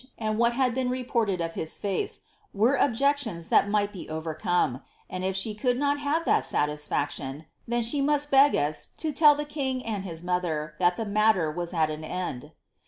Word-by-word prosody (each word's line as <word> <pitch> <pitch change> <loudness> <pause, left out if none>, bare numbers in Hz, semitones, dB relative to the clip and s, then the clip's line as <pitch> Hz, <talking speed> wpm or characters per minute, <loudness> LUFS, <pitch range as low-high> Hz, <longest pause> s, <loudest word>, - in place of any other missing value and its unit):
and 215 -1 -2
what 235 0 +3
had 255 -1 +1
been 255 0 -1
reported 235 -7 -1
of 165 0 -3
his 160 - -4
face, 200 -2 -2 0.3
were 225 +7 +3
objections 255 - 0
that 200 - +4
might 205 0 +1
be 185 - -8
ove^ 155 0 -5
come, 155 -8 +1 0.3
and 185 0 -4
if 190 0 -1
she 200 +3 0
could 245 +3 0
not 285 +1 +1
have 295 +4 0
that - - +3
satisfaction, 150 -1 -2 0.2
then 240 0 0
she 260 +5 +2
must 290 +1 +1
beg 275 +1 +6
w 145 +1 +1 0.3
lo 315 - 0
tell 295 0 +6
the 295 +1 -3
king 265 -4 -3
and 210 -4 -3
his 170 -3 -7
mother, 170 -4 -2
that 180 -1 +3
the 225 - -2
matter 205 -6 +2
was 175 +2 -4
at 160 -3 +1
an 155 +1 -6
end." 155 -6 -5
205 Hz, 195 wpm, -27 LUFS, 165-260 Hz, 0.3 s, beg